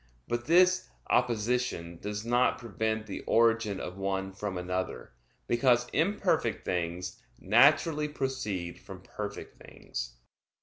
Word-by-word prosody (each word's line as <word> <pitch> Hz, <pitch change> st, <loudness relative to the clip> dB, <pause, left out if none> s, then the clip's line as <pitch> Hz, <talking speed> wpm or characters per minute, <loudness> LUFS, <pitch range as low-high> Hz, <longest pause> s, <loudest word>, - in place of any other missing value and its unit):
But 120 Hz, 0 st, -2 dB
this 185 Hz, +2 st, +4 dB, 0.2 s
opposition 120 Hz, -7 st, 0 dB
does 105 Hz, +1 st, -4 dB
not 120 Hz, +1 st, +3 dB
prevent 110 Hz, -1 st, -2 dB
the 100 Hz, -, -6 dB
origin 115 Hz, -3 st, +3 dB
of 90 Hz, +2 st, -6 dB
one 95 Hz, 0 st, -2 dB
from 100 Hz, -1 st, -4 dB
another, 90 Hz, -5 st, -3 dB, 0.3 s
because 120 Hz, 0 st, +3 dB
imperfect 180 Hz, +8 st, +1 dB
things 90 Hz, +1 st, -3 dB, 0.2 s
naturally 145 Hz, -, +4 dB
proceed 120 Hz, -12 st, -3 dB
from -, -, -11 dB
perfect -, -, -7 dB
things. -, -, -7 dB
110 Hz, 115 wpm, -30 LUFS, 95-125 Hz, 0.3 s, this